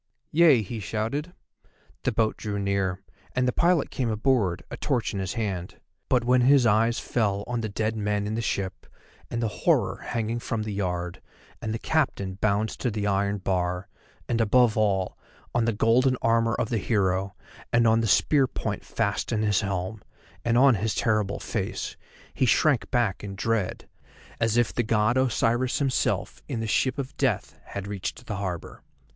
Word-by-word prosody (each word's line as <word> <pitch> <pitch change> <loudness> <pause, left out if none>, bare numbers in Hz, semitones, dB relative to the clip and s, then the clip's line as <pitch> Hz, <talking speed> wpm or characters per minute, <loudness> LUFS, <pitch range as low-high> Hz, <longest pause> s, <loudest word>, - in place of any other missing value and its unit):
"Yea," 155 -8 +6
he 110 +3 -5
shouted. 115 - -3 0.7
The - - 0
boat 110 -1 +1
drew 105 -2 -4
near, 100 -1 -1 0.3
and 125 0 +2
the - - +3
pilot 170 -3 +2
came 125 -3 -1
aboard, 110 -5 +1
a - - -3
torch 125 -7 -1
in 100 - -2
his 95 -1 -2
hand; 95 -6 -3 0.3
but 125 -2 +3
when 125 +1 +4
his 135 0 +5
eyes 115 +2 +3
fell 100 -4 0
on 120 -1 -2
the 110 - -3
dead 110 +2 -1
men 105 -1 -1
in 105 - -2
the 115 - -1
ship, 95 -4 -3 0.4
and 120 0 -2
the - - +2
horror - - +2
hanging 115 0 -3
from 115 -2 -3
the 105 -1 -4
yard, 90 -2 -3 0.4
and 110 - -3
the 110 - -1
captain 115 -9 0
bound 105 +2 +1
to 125 - -3
the 105 -2 -2
iron 100 0 +1
bar, 90 -1 -1 0.4
and 115 -1 +1
above 115 +1 +4
all, 100 -4 0 0.3
on 120 -1 +2
the 115 - +2
golden 125 +4 +3
armour 115 0 +3
of - - -1
the 115 - 0
hero, 95 -3 0 0.4
and 120 0 +4
on 115 0 +4
the 115 - 0
spear 135 +6 +4
point 105 -4 -4
fast 100 0 -1
in 110 -2 0
his 105 -2 +2
helm, 100 +1 -3 0.4
and 120 0 +2
on 135 +1 +7
his 110 0 -1
terrible 110 -3 +1
face, - - -3 0.4
he 130 - +1
shrank 145 +2 +3
back 115 -7 0
in 100 -1 -6
dread, 110 -1 -1 0.5
as 115 0 +1
if 120 -1 +2
the - - +1
God 110 +1 +2
Osiris 125 -1 +1
himself, 135 -3 0
in 115 - -3
the 115 - -2
Ship 130 +5 +1
of 140 -1 -5
Death, 125 -8 -1
had 100 -1 -6
reached 100 +4 -5
the 105 -5 -4
harbour. 90 -4 -5
110 Hz, 180 wpm, -26 LUFS, 100-120 Hz, 0.7 s, on